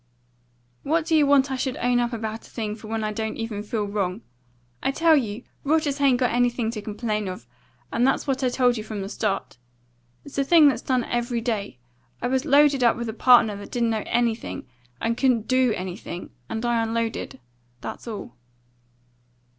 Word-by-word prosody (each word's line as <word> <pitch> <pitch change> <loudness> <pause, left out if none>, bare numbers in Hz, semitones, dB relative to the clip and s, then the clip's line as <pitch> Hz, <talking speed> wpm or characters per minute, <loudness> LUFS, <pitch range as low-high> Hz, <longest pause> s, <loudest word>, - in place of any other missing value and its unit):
"What 320 +2 0
do 325 -1 +2
you 300 -2 +5
want 275 -1 +4
I - - 0
should 260 0 -2
own 245 0 +2
up 240 0 0
about 225 -1 -5
a - - -19
thing 215 -3 -4
for 215 0 -11
when 220 0 -2
I 215 0 -2
don't 220 0 -3 0.3
feel 215 -1 -2
wrong? 200 0 -2 0.6
I - - +1
tell 325 +3 +4
you 230 -4 -1 0.2
Rogers 295 -1 +1
hain't 275 -3 +4
got 250 -1 +1
anything 240 -1 +1
to 215 -2 -5
complain 215 -1 -3
of, 185 -9 -6 0.5
and 240 +2 +3
that's 270 - +1
what 270 -1 -1
I 255 - +3
told 245 -1 +2
you 215 - -4
from 215 -2 -5
the 195 - -5
start. 205 - -2 0.7
It's 285 -1 -5
a - - +3
thing 310 +1 +6
that's 280 - +2
done 255 -2 +1
every 240 0 -1
day. 215 - -3 0.4
I - - -4
was 260 0 0
loaded 285 -2 +5
up 235 - +4
with 235 -1 -3
a - - -3
partner 235 -3 +5
that 205 - -9
didn't 235 -2 +1
know 220 -1 0
anything, 235 - -1 0.3
and 230 0 0
couldn't 245 -4 +2
do 255 -2 +3
anything, 180 -1 -6 0.2
and 225 +2 -3
I 240 -1 +2
unloaded; 225 - -2 0.4
that's - - -7
all." 205 - -6
235 Hz, 195 wpm, -24 LUFS, 215-260 Hz, 0.7 s, thing